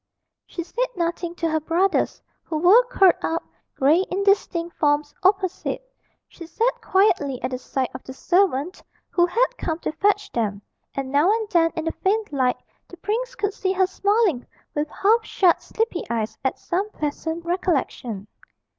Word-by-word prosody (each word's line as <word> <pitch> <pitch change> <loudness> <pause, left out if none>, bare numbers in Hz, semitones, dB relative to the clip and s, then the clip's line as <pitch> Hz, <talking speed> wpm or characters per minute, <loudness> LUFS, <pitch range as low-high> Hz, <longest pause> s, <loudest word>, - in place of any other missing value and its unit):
She 345 - -5
said 485 +9 -1
nothing 340 0 -2
to 335 - -1
her 315 0 +1
brothers, 345 +5 0 0.2
who 315 - -4
were 370 +10 +6
curled 390 -7 +5
up, 330 +1 -1 0.3
grey 305 +7 +4
indistinct 375 -3 +1
forms, 295 0 +1
opposite; 385 +5 0 0.4
she 335 - -11
sat 460 +8 0
quietly 340 - +2
at 255 - -1
the 255 - -3
side 260 0 -2
of 255 - -8
the - - -9
servant 350 +2 +1 0.3
who 345 -1 +3
had 465 +8 +3
come 320 -1 -2
to - - -2
fetch 410 +5 +1
them, 210 -4 -1 0.4
and 270 -1 -3
now 290 +6 +4
and 440 0 0
then 330 -2 +4
in 320 - -3
the 325 - 0
faint 415 -1 -1
light 255 -3 +1 0.3
the 355 - -13
prince 475 +7 -2
could 405 -3 -1
see 380 -1 -1
her 380 0 +3
smiling 395 - +1 0.3
with 295 +1 -1
half 445 +8 +2
shut 365 -5 +2
sleepy 445 -5 -2
eyes 220 -1 -2
at 265 - 0
some 385 +4 -2
pleasant 320 0 -4
recollection. 290 - -1
345 Hz, 165 wpm, -23 LUFS, 295-395 Hz, 0.4 s, were